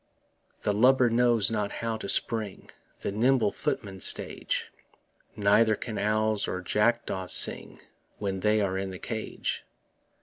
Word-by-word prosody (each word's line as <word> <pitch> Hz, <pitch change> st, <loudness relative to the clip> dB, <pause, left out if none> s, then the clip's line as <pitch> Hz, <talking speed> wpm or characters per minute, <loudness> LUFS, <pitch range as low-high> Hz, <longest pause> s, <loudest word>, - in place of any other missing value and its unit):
The 105 Hz, -, 0 dB
lubber 125 Hz, +2 st, +4 dB
knows 115 Hz, -3 st, +2 dB
not 105 Hz, -2 st, -2 dB
how 115 Hz, -1 st, -3 dB
to 105 Hz, -, -7 dB
spring 110 Hz, -3 st, -2 dB, 0.3 s
The -, -, -3 dB
nimble 115 Hz, 0 st, +2 dB
footman's 95 Hz, -3 st, -4 dB
stage; -, -, -1 dB, 0.6 s
Neither 105 Hz, +2 st, +3 dB
can 110 Hz, 0 st, -6 dB
owls 110 Hz, 0 st, 0 dB
or 95 Hz, -, -3 dB
jackdaws 105 Hz, -1 st, -1 dB
sing -, -, +5 dB, 0.4 s
When 95 Hz, -2 st, -3 dB
they 105 Hz, +2 st, +2 dB
are 95 Hz, -1 st, -1 dB
in 95 Hz, 0 st, -4 dB
the 95 Hz, -, -7 dB
cage. 110 Hz, +3 st, -5 dB
105 Hz, 135 wpm, -27 LUFS, 100-115 Hz, 0.6 s, sing